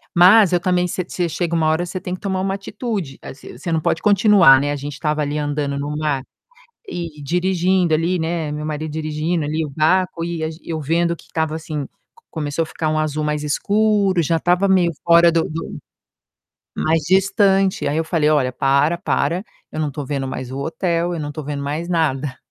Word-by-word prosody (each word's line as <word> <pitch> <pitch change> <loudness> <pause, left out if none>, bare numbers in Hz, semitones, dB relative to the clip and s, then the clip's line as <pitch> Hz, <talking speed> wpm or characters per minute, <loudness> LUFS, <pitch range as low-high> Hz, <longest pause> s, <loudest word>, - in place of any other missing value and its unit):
mas 185 +2 +7
eu 175 - +3
também 180 0 +1
você 180 +1 -3
você 175 -1 -2
chega 170 +1 -2
uma 160 -1 +2
hora 160 +3 +1
você 185 +1 -5
tem 180 - -5
que 185 - -5
tomar 190 -2 -2
uma 195 0 -1
atitude, 195 - -4
assim 135 - -11
assim, - - -11
você 165 +6 -5
não 160 -1 +1
pode 160 - 0
continuar, 200 -9 +6
né, 145 +1 -1
a - - -1
gente 145 +1 -6
estava 150 +1 -1
ali 145 +1 -2
andando 145 -1 -2
no 145 +1 -3
mar, 150 -3 -1 0.7
e 165 - -6
dirigindo 180 +1 +1
ali, 170 +3 +1
né, 160 -2 -2
meu 150 +1 -4
marido 155 0 -4
dirigindo, 155 +1 -2
ali, 155 +2 -1
o - - -7
barco 165 +4 +1
e 170 -1 -3
as 160 0 -3
e - - -14
eu 160 -1 -2
vendo 170 +3 +1
que - - -18
estava 160 -1 -2
assim, 155 -3 -4 0.4
começou 155 0 -2
a - - -5
ficar 155 0 -3
um 155 0 0
azul 155 0 -1
mais 150 0 -1
escuro, 200 +3 +2
já 165 +1 +1
estava 180 +4 +2
meio 185 -3 +3
fora 170 0 +6
do 165 0 +2
do 160 +1 -6 1.0
mais 160 0 +1
distante. 195 -2 +3
Aí 145 - -1
eu 160 - 0
falei: 160 -2 +1
"Olha, 135 -4 +2
para, 140 +6 +2
para, 175 +1 0 0.3
eu 155 - -3
não 150 - 0
estou 145 +1 -5
vendo 135 -2 -3
mais 130 -1 -5
o 135 - -5
hotel, 170 +3 -1
eu - - -4
não 145 - -4
estou 155 +1 -6
vendo 145 0 -4
mais 150 +5 -3
nada". 145 -5 0
160 Hz, 215 wpm, -20 LUFS, 150-180 Hz, 1.0 s, mas